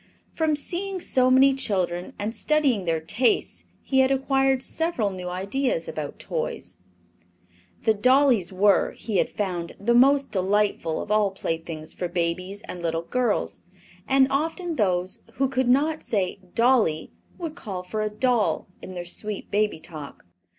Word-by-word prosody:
From 315 -2 +1
seeing 370 +6 -2
so 255 -6 +2
many 265 +1 +6
children 185 -9 -1
and 215 +3 -3
studying 280 -10 +2
their 165 -1 +1
tastes 220 +10 0 0.2
he 265 - +1
had 265 0 +5
acquired 270 -1 +2
several 320 -13 -1
new 180 -1 -6
ideas 195 +1 -1
about 150 -2 -5
toys. - - -4 1.1
The 220 - +4
dollies 250 -4 +3
were, 195 +2 +3
he 215 -4 -3
had - - +2
found, 180 -5 -3
the 235 +4 +2
most 275 +3 +4
delightful 195 -4 0
of 210 - -8
all 210 -1 +3
playthings 165 -4 -4
for 180 - -3
babies 180 +3 -2
and 180 - -7
little 165 -1 -1
girls, 250 +6 -1 0.5
and 270 0 +5
often 325 +4 -1
those 185 -5 0
who 270 - +2
could 260 -1 0
not 300 +5 +2
say 195 -2 -1 0.2
"dolly" 230 -10 +2 0.3
would 330 -3 -5
call 195 - -6
for 215 +4 -3
a 215 - 0
"doll" 215 -6 +1 0.2
in 185 - -9
their 175 -1 -5
sweet 210 +3 -6
baby 210 -1 +1
talk. 155 - -10
210 Hz, 150 wpm, -25 LUFS, 180-265 Hz, 1.1 s, many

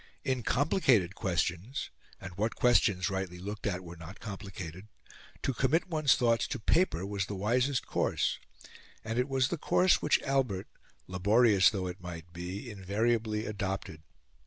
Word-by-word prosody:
In 130 -3 0
complicated 125 - +2
questions 90 +6 -2 0.3
and 95 -2 -9
what 110 +4 -1
questions, 100 -7 +3
rightly 95 -2 -3
looked 100 +4 -5
at, 90 -2 -2
were 85 0 -9
not 85 +4 -11
complicated? 95 -3 -7 0.6
to 135 - 0
commit 150 +9 +1
one's 155 -5 +4
thoughts 115 -2 +2
to 130 - -4
paper 110 - +2
was 100 -1 -2
the 105 - -4
wisest 125 +7 +1
course, - - 0 0.6
and 110 +2 -2
it 125 +3 0
was 135 -1 +2
the 170 - -3
course 180 +5 +3
which 150 - +3
Albert, 130 -9 0 0.4
laborious 100 +2 +4
though 95 -4 -3
it 90 0 -6
might 85 -1 -8
be, 90 +7 -6
invariably 110 +2 -1
adopted. 95 -6 -4
105 Hz, 150 wpm, -31 LUFS, 95-125 Hz, 0.6 s, one's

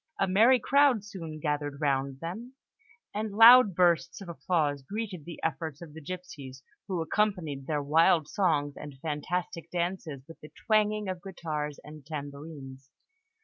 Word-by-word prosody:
A 195 - +2
merry 225 +7 +5
crowd 275 -3 +3
soon 165 -7 -8
gathered 145 -1 -2
around 140 -2 -1
them, 220 +10 -7 0.6
and 210 0 -3
loud 230 -2 +8
bursts 175 -2 +2
of 195 -3 -9
applause 155 -4 -1
greeted 195 0 -6
the 170 - -9
efforts 160 -1 -3
of 165 -4 -11
the 160 - -10
gipsies, 140 -6 -8 0.2
who 180 -4 -2
accompanied 160 -8 -1
their 150 -2 -1
wild 155 +1 +4
songs 150 -7 0
and 145 -2 -9
fantastic 165 +3 -4
dances 170 -6 -3
with 165 - -13
the 150 - -11 0.2
twanging 215 -1 +2
of 185 -2 -4
guitars 155 -6 -5
and 150 -1 -12
tambourines. 140 -2 -8
165 Hz, 145 wpm, -29 LUFS, 145-195 Hz, 0.6 s, loud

